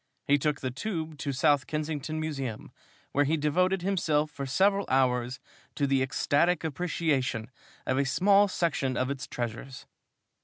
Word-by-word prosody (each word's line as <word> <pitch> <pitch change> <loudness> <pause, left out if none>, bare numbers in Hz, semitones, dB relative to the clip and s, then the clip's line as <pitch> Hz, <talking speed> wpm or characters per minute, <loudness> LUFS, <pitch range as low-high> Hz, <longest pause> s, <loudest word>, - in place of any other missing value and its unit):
He 145 0 +3
took 150 0 -1
the 130 - -2
Tube 160 - -4
to 140 -1 -2
South 140 -1 +2
Kensington 155 0 -3
Museum, 135 -8 -4 0.4
where 145 - +3
he 155 +3 +1
devoted 180 +5 +1
himself 155 -6 +1
for 140 -1 -5
several 195 +8 +2
hours 125 -1 +1 0.4
to 145 - +1
the 135 -1 +2
ecstatic 145 +6 +1
appreciation 145 -7 -1 0.3
of 130 +1 +1
a 140 - +2
small 200 +9 +4
section 155 -8 -1
of 130 +1 0
its 140 -1 -5
treasures. 120 +2 -5
145 Hz, 150 wpm, -28 LUFS, 130-160 Hz, 0.4 s, small